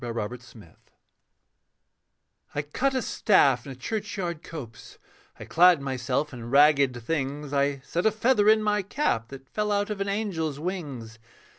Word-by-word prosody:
MODERN 115 -3 -3
ELFLAND 110 -8 -16 1.8
I 145 - -1
Cut 265 - -1
a 260 - 0
staff 140 - +3
in - - -6
a - - -8
churchyard 185 - -4
copse, 120 -11 -10 0.4
I - - -8
clad 175 -1 +5
myself 135 +1 -2
in 120 -2 -8
ragged 140 -2 +4
things, 145 +1 -3
I 140 -1 +1
set 175 +5 0
a - - +4
feather 215 -1 +3
in 215 0 +5
my 210 0 +1
cap 190 - -1
That 135 +1 -11
fell 210 +8 -2
out 205 +1 0
of 200 -1 -4
an 200 - -1
angel's 170 -8 -2
wings. 140 -11 -5
150 Hz, 155 wpm, -26 LUFS, 130-205 Hz, 1.8 s, clad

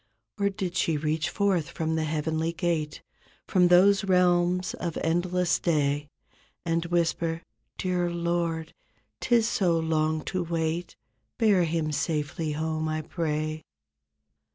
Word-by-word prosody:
Or 200 0 +2
did 190 -2 -4
she 165 -3 +1
reach 155 +1 -1
forth 195 -7 0
from 160 0 -2
the 160 -1 0
heavenly 160 +1 -1
gate 160 -4 -2 0.4
From 180 -2 +4
those 195 +3 +5
realms 180 -1 +2
of 170 -3 -4
endless 175 +1 +1
day. 145 -3 +1 0.6
And 165 0 0
whisper, 170 -1 0 0.3
"Dear 180 -1 0
Lord, 170 -1 -2 0.5
'tis 230 -2 +3
so 180 -7 +2
long 155 -1 0
to 185 -1 -2
wait; 165 +1 -2 0.4
Bear 200 -6 +4
him 160 -1 -1
safely 150 +1 -2
home, 155 +1 -2
I 155 0 -2
pray?" 155 -1 -2
165 Hz, 125 wpm, -27 LUFS, 155-180 Hz, 0.6 s, those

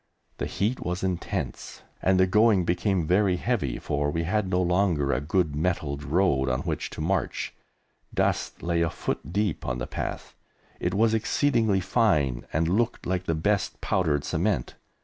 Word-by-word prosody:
The - - -1
heat 110 +6 -1
was 90 +2 -3
intense, 90 -5 -3 0.2
and 95 0 +3
the 95 - +6
going 105 -1 +4
became 90 0 +1
very 95 +2 +3
heavy, 90 - -1
for 75 0 -1
we 85 +3 -1
had 95 +3 0
no 90 -1 +1
longer 90 -5 +2
a 65 - 0
good 80 0 0
metalled 75 -3 -1
road 75 -4 +2
on 65 +1 0
which - - -3
to - - -3
march. - - -1 0.6
Dust - - -1
lay 85 0 +1
a 85 - +2
foot - - -4
deep 100 -2 0
on 65 0 -2
the 60 - -3
path; - - -5 0.5
it 90 +2 -1
was 110 +2 +3
exceedingly 110 -3 +2
fine 85 - +1
and 80 +2 +1
looked 115 +7 0
like 90 0 -1
the 80 - 0
best 95 +4 0
powdered 80 -8 +1
cement. 90 - -1
90 Hz, 170 wpm, -26 LUFS, 80-100 Hz, 0.6 s, the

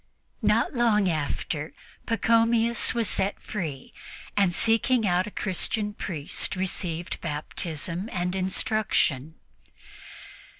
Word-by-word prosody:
Not 215 +4 +2
long 225 -5 +3
after, 155 -1 -2 0.3
Pachomius 230 0 +3
was 230 -2 +1
set 190 +2 0
free 155 -10 -5 0.4
and, 195 -3 +3
seeking 225 +4 +2
out 180 +1 +2
a - - -4
Christian 210 +2 -1
priest, 165 -6 -3
received 180 -2 -3
Baptism 165 +4 -3
and 180 0 -1
instruction. 185 -6 +1
190 Hz, 95 wpm, -26 LUFS, 170-225 Hz, 0.4 s, long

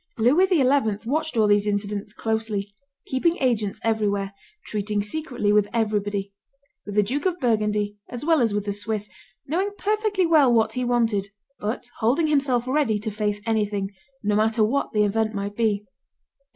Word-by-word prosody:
Louis 275 +12 +4
XI. 350 -7 +3 0.4
watched 315 0 -1
all 220 - +5
these 205 0 +3
incidents 205 0 -2
closely, 220 -2 -2 0.3
keeping 330 +7 +1
agents 220 -6 0
everywhere, 205 -3 0 0.3
treating 210 -1 -2
secretly 245 -4 -1
with 210 -1 +4
everybody, 205 -3 -1 0.5
with 205 - -5
the 210 - +5
Duke 275 - -1
of 360 -1 -2
Burgundy 210 -4 0
as 245 +3 -6
well 325 -3 +4
as 230 -3 +2
with 205 0 -2
the 205 - -1
Swiss, 210 0 -4 0.3
knowing 365 +8 0
perfectly 420 -2 +1
well 305 -6 +5
what 220 -1 +3
he 250 - -2
wanted, 230 -5 +1 0.3
but 215 +3 -3
holding 255 +9 +2
himself 270 -5 +1
ready 260 -5 +2
to 215 +1 -4
face 210 -1 -2
anything, 205 -3 0 0.3
no 205 0 +1
matter 220 +1 +2
what 265 +6 0
the 210 -1 +2
event 215 +1 0
might 200 +1 -4
be. 210 -3 0
220 Hz, 165 wpm, -24 LUFS, 205-255 Hz, 0.5 s, all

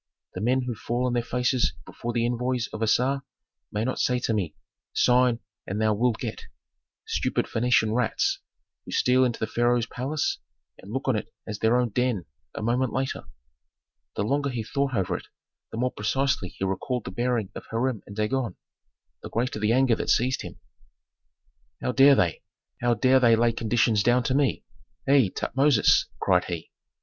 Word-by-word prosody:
The 90 - -5
men 130 +4 +2
who 125 -1 -3
fall 120 +2 -2
on 125 - 0
their 120 - +2
faces 125 +1 0
before 120 - -5
the 120 0 0
envoys 125 0 -1
of 110 - -5
Assar 125 +5 +2 0.5
may 105 +2 -1
not 130 - -2
say 125 - +2
to 115 - 0
me, 90 -8 -2 0.4
'Sign 125 -1 +3 0.3
and 100 +3 -3
thou 110 -1 +3
wilt 115 +2 +1
get!' - - -5 0.6
Stupid - - 0
Phœnician 115 -2 +2
rats, 120 -1 +1 0.4
who - - -13
steal 130 +1 +3
into 120 -2 0
the - - 0
pharaoh's 120 +1 +1
palace 135 +6 -2 0.4
and 100 - -11
look 130 +3 -3
on 130 - +3
it 105 - -4
as 105 -1 -5
their 110 +2 +3
own 125 -1 +1
den 120 -5 0 0.3
a - - -4
moment 120 +2 +1
later!" 130 - -2 0.9
The - - -1
longer 140 +5 0
he 120 -4 -3
thought 140 +3 -1
over 95 -3 0
it - - -7 0.4
the - - -6
more 125 +2 0
precisely 135 -1 0
he 95 - -4
recalled 105 +6 -2
the - - -5
bearing 120 -1 -1
of - - -9
Hiram 115 -1 -1
and 100 - -9
Dagon, 115 +3 -1 0.7
the - - -8
greater 120 -1 -1
the 105 +1 +1
anger 130 -1 +4
that - - -4
seized 130 +2 +2
him, - - -8 1.2
"How - - -1
dare 140 +2 +7
they 90 -9 +1 0.4
how 120 0 +2
dare 130 +4 +4
they 120 -3 +5
lay 115 +1 +3
conditions 115 -1 +2
down 120 +3 +3
to 130 - 0
me? 140 0 +1 0.4
Hei, 135 -7 +5
Tutmosis!" 135 +2 +3
cried - - +2
he. 85 -2 -6
120 Hz, 180 wpm, -26 LUFS, 110-130 Hz, 1.2 s, dare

